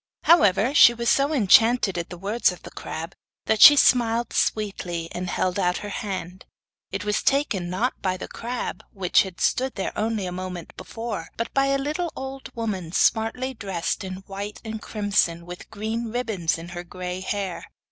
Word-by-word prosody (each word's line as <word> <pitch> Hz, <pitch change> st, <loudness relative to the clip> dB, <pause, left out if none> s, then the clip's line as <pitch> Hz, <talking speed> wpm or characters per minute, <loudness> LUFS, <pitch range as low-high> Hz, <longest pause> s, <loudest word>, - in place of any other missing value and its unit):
However, 220 Hz, -, +4 dB
she 240 Hz, -4 st, +8 dB
was 235 Hz, 0 st, -1 dB
so 280 Hz, +2 st, +2 dB
enchanted 225 Hz, -4 st, +4 dB
at 170 Hz, -1 st, -4 dB
the 180 Hz, -, -8 dB
words 205 Hz, +4 st, +1 dB
of 180 Hz, -, -11 dB
the -, -, -10 dB
crab 165 Hz, +3 st, -6 dB, 0.3 s
that 220 Hz, -1 st, +1 dB
she 295 Hz, -, +11 dB
smiled 235 Hz, -3 st, +3 dB
sweetly 180 Hz, -6 st, -1 dB
and 180 Hz, 0 st, -4 dB
held 185 Hz, +2 st, -1 dB
out 180 Hz, -1 st, +1 dB
her -, -, -5 dB
hand; 190 Hz, -4 st, -5 dB, 0.5 s
it 195 Hz, +1 st, -4 dB
was 210 Hz, 0 st, 0 dB
taken, 245 Hz, -, +1 dB
not 220 Hz, +8 st, -2 dB
by 185 Hz, -1 st, -1 dB
the -, -, -7 dB
crab, 240 Hz, +1 st, -5 dB
which 190 Hz, -3 st, +3 dB
had 190 Hz, -2 st, -6 dB
stood 260 Hz, +1 st, 0 dB
there 195 Hz, -, -3 dB
only 220 Hz, -2 st, -1 dB
a 180 Hz, -, -4 dB
moment 180 Hz, -1 st, -6 dB
before, 225 Hz, -2 st, -6 dB
but 230 Hz, -, -3 dB
by 275 Hz, 0 st, +3 dB
a 275 Hz, 0 st, +2 dB
little 310 Hz, +5 st, -2 dB
old 265 Hz, 0 st, -7 dB
woman 200 Hz, -8 st, -3 dB
smartly 225 Hz, +7 st, +1 dB
dressed 195 Hz, -5 st, -3 dB
in 185 Hz, 0 st, -7 dB
white 200 Hz, +2 st, -6 dB
and 220 Hz, 0 st, -5 dB
crimson 200 Hz, -6 st, 0 dB
with 180 Hz, 0 st, -10 dB
green 220 Hz, +2 st, -3 dB
ribbons 220 Hz, -10 st, -1 dB
in 165 Hz, +1 st, -9 dB
her 175 Hz, 0 st, -6 dB
grey 180 Hz, +1 st, -6 dB
hair. 195 Hz, -1 st, -3 dB
205 Hz, 180 wpm, -24 LUFS, 185-235 Hz, 0.5 s, she